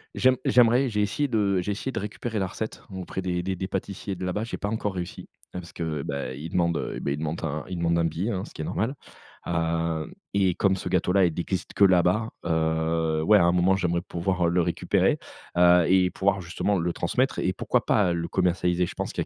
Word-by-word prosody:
J'aim 130 0 +4
j'aimerais, 125 +2 +4
j'ai 105 -1 0
essayé 125 +8 0
de 100 -6 +1
j'ai 105 - -2
essayé 105 +6 -3
de 115 - -3
récupérer 105 +2 -4
la 95 - +1
recette 110 +4 -6
auprès 95 0 -5
des 90 -1 -1
des 95 +1 -2
des 95 +1 -4
pâtissiers 95 +1 -4
de 90 - -7
là-bas. 90 +4 -1
J'ai 115 - -5
pas 100 - -3
encore 105 -2 -2
réussi 90 -1 -6 0.2
parce 90 -2 -8
que, 80 -4 -3
bah, 70 -2 -4
ils 75 +5 -7
demandent, 85 -1 +1
heu, - - -4
bah, 70 - -2
ils 70 - -1
demandent 80 +1 -4
un 75 -1 -2
ils 90 - -5
demandent 85 0 +1
un 85 - +2
billet, 85 +6 -2
hein, 95 -1 -3
ce - - -14
qui - - -7
est 75 - -3
normal. 115 +8 -1 0.5
Heu, 80 -1 -1 0.2
et 95 -3 +3
comme 95 +1 +2
ce 95 - -6
gâteau 90 0 +1
là, 95 -1 +5
il 85 - 0
existe 90 +3 -3
que - - +3
là-bas, 95 +3 +4 0.2
heu, 80 0 0
ouais, 105 +4 +6
à - - +4
un 85 - +4
moment, 90 +2 +3
j'aimerais 85 -2 0
pouvoir 90 0 -1
le 90 +1 +2
récupérer, 85 0 +1 0.4
heu, 90 -1 +6
et 90 -1 +4
pouvoir 100 0 +1
justement 90 +3 -1
le 85 0 -1
transmettre - - 0
et - - +1
pourquoi - - 0
pas 95 -4 +3
le 85 0 -2
commercialiser, 90 -1 +1
je - - -7
pense - - -4
qu'il - - -2
y - - -2
90 Hz, 235 wpm, -26 LUFS, 85-100 Hz, 0.5 s, ouais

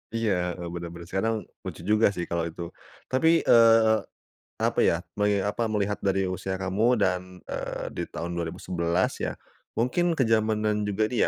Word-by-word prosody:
Iya, 95 -6 0
heeh, 85 - -5
bener 85 -1 -5
bener, 85 0 -9
sekarang 95 +6 0 0.3
lucu - - -7
juga 105 +2 +4
sih 90 -3 -3
kalau 85 -1 0
itu. 85 +1 -7 0.4
Tapi, 130 +5 +3 0.2
eee, 115 -1 +6 0.6
apa - - +1
ya, - - +4 0.2
meli 105 -1 +2
apa, 110 +3 -1
melihat 105 -1 -1
dari 95 -1 +1
usia 95 +1 -3
kamu 100 +6 +2
dan, 90 -1 +2 0.2
eee, - - -4
di - - -3
tahun 85 +1 -5
2011 85 +1 -1
ya, - - -2 0.4
mungkin 165 +9 +1
kezamanan 110 -4 +2
juga 105 +2 +1
ini - - -1
100 Hz, 160 wpm, -26 LUFS, 90-110 Hz, 0.6 s, eee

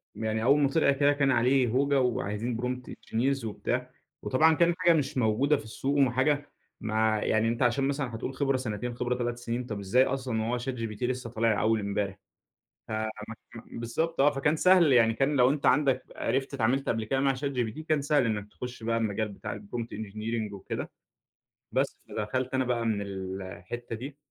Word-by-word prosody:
يعني 110 0 -2
أول 140 +5 +5
ما 140 -2 +3
طِلِع 140 0 +3
كده 140 +1 +3
كان 140 -1 +2
عليه 125 +1 +3
هوجة 140 +3 +2
وعايزين 115 -1 -1
prompt 125 0 -3
engineers 135 +3 -1
وبتاع، 125 +4 -3 0.3
وطبعًا 160 +5 +4
كان 170 +2 +4
حاجة 175 -2 +4
مش 145 -4 -1
موجودة 130 +6 +3
في - - -8
السوق 135 +6 -2
وحاجة 140 +2 +2 0.3
ما 110 0 +1
يعني 110 +1 +1
أنت 115 +2 -1
عشان 125 +2 +2
مثلًا 135 -4 -2
هتقول 120 +4 -4
خبرة 135 -1 +1
سنتين 120 -1 -4
خبرة 125 +1 -1
3 120 -1 -2
سنين 120 +1 -3
طَب 105 -4 -5
إزاي 100 +7 +3
أصلًا 130 -4 -2
وهو 115 +3 -1
chatgpt 115 -4 -4
لسه 125 -1 -2
طالع 110 -2 +1
أول 110 0 +2
إمبارح! 100 -1 -2 0.7
ف - - -11
م 110 +2 -6
بالضبط 160 +9 -2
آه. 145 +2 +6
فكان 145 +2 +1
سهل 180 -3 +5
يعني 115 -2 +5
كان 140 +5 +1
لو 125 -1 +5
أنت 145 0 -1
عندك 135 0 +3
عرِفت 135 +1 -1
اتعاملت 135 +2 +1
قبل 110 -1 0
كده 135 +4 0
مع 135 -1 +2
chatgpt 130 -2 -2
كان 155 -2 +2
سهل 145 -3 +2
إنك 105 -2 -2
تخش 125 -1 -7
بقى 115 0 0
المجال 110 -1 -1
بتاع 100 0 -6
الprompt 115 +3 -5
engineering 110 +1 -4
وكده، 100 -1 -5 0.8
بس - - 0
فدخلت 130 +5 -2
أنا 130 0 +1
بقى 120 -2 0
من 110 -3 0
ال 95 -1 -5
الحتة 95 +6 -6
دي 135 +5 -8
125 Hz, 185 wpm, -28 LUFS, 110-135 Hz, 0.8 s, آه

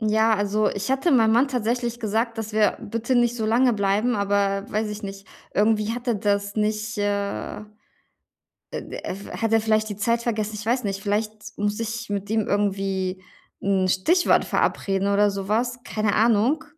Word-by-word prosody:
Ja. 220 +1 +3
Also, 205 +1 +1
ich 205 +5 -4
hatte 270 +6 +2
meinem 225 -4 +4
Mann 255 +4 +4
tatsächlich 240 -1 -1
gesagt, 225 +2 -1
dass 220 -1 -4
wir 215 -1 +3
bitte 230 +3 -2
nicht 240 0 +2
so 220 -1 -1
lange 245 +2 +3
bleiben, 205 +4 +1
aber, 200 -1 +1
weiß 215 0 -1
ich 210 +1 -6
nicht, 195 0 -7 0.3
irgendwie 215 +1 +2
hat 245 +1 -7
er 235 - +2
das 200 0 0
nicht, 215 0 -1
äh, 200 0 -2 1.1
äh, - - -5
d - - -8 0.4
hat 225 -1 -1
er 225 - +5
vielleicht 215 0 +1
die 205 - -5
Zeit 230 +3 0
vergessen. 215 -2 -2
Ich 210 +1 -7
weiß 245 0 +1
nicht, 195 0 -3
vielleicht 215 +1 -3
muss 205 +2 -1
ich 230 +1 -4
mit 200 0 -3
ihm 220 -2 +1
irgendwie 195 -2 -1 0.4
'n 190 -1 +1
Stichwort 320 - +3
verabreden 195 0 0
oder 205 0 +4
sowas, 220 +5 -1
keine 215 -1 -1
Ahnung, 235 +8 +3
215 Hz, 175 wpm, -24 LUFS, 200-230 Hz, 1.1 s, er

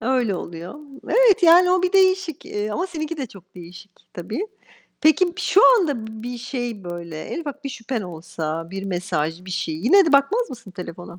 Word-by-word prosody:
Öyle 240 -3 +1
oluyor. 170 0 -7 0.3
Evet 475 -7 +4
yani 355 +2 +7
o 365 0 +3
bir 365 +1 +1
değişik. 375 -4 +2
Eee, 210 +1 -3
ama 350 - -2
seninki 330 -2 -5
de 275 -4 -4
çok 190 -3 -17
değişik 180 +2 -12 0.2
tabii. 220 - -4 0.5
Peki 345 +3 +3
şu 410 +4 +6
anda 280 - -1
b 220 0 -9
bir 245 0 -5
şey, 240 -5 -5
böyle 170 -2 -7
en - - -5
ufak 290 -2 -7
bir - - -2
şüphen 235 -2 -4
olsa, 165 -1 -5
bir 195 0 -5
mesaj, 175 -2 -3
bir 185 - -9
şey. 175 -3 -2
Yine 255 - +5
de 305 - +1
bakmaz 410 - +3
mısın 230 -5 -10
telefona? 175 -1 -9
230 Hz, 190 wpm, -22 LUFS, -, 0.5 s, yani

